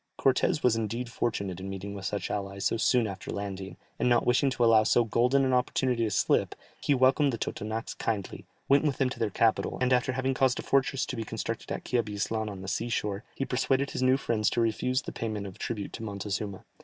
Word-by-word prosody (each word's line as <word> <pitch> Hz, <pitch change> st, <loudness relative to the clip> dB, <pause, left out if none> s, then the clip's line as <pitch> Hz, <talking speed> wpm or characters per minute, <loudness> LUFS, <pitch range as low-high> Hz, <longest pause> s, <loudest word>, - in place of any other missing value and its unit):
Cortès 135 Hz, +2 st, +2 dB
was 125 Hz, -3 st, +4 dB
indeed 115 Hz, +2 st, -3 dB
fortunate 100 Hz, -7 st, -2 dB
in 95 Hz, +1 st, -6 dB
meeting 95 Hz, +1 st, -5 dB
with 100 Hz, -2 st, -7 dB
such 100 Hz, -1 st, -2 dB
allies 100 Hz, -1 st, -3 dB
so -, -, +2 dB
soon 120 Hz, +1 st, +3 dB
after 95 Hz, -2 st, -6 dB
landing, 95 Hz, -1 st, -5 dB, 0.2 s
and 125 Hz, -, +2 dB
not 120 Hz, -1 st, +3 dB
wishing 125 Hz, +3 st, +3 dB
to 125 Hz, -2 st, 0 dB
allow 115 Hz, -1 st, +6 dB
so 120 Hz, +2 st, +3 dB
golden 125 Hz, +4 st, +2 dB
an 130 Hz, -, +1 dB
opportunity 125 Hz, -1 st, +1 dB
to -, -, 0 dB
slip, 100 Hz, -, +1 dB, 0.3 s
he 145 Hz, -, +2 dB
welcomed 135 Hz, +2 st, +4 dB
the 115 Hz, -, -3 dB
Totonacs 110 Hz, +1 st, -4 dB
kindly, 105 Hz, -4 st, -3 dB, 0.2 s
went 140 Hz, +2 st, +5 dB
with 145 Hz, -3 st, 0 dB
them 130 Hz, -1 st, +1 dB
to -, -, -7 dB
their 110 Hz, -, +1 dB
capital, 110 Hz, +3 st, +1 dB
and 125 Hz, 0 st, +2 dB
after 125 Hz, +1 st, +2 dB
having 130 Hz, +1 st, 0 dB
caused 130 Hz, -1 st, +2 dB
a -, -, -4 dB
fortress 135 Hz, -1 st, +1 dB
to -, -, -5 dB
be 115 Hz, -, -3 dB
constructed 110 Hz, +1 st, -5 dB
at -, -, -4 dB
Quiabislan 110 Hz, -2 st, -1 dB
on 100 Hz, -2 st, -7 dB
the -, -, -7 dB
sea 115 Hz, +5 st, -2 dB
shore, 105 Hz, -2 st, -2 dB
he 135 Hz, -, -2 dB
persuaded 135 Hz, +2 st, 0 dB
his -, -, -3 dB
new 130 Hz, +1 st, +4 dB
friends 110 Hz, -5 st, +1 dB
to -, -, -1 dB
refuse 120 Hz, +3 st, +1 dB
the -, -, -6 dB
payment 110 Hz, -3 st, -4 dB
of 95 Hz, -2 st, -9 dB
tribute 105 Hz, -4 st, -4 dB
to -, -, -7 dB
Montezuma. 100 Hz, -2 st, -4 dB
115 Hz, 225 wpm, -29 LUFS, 105-130 Hz, 0.3 s, allow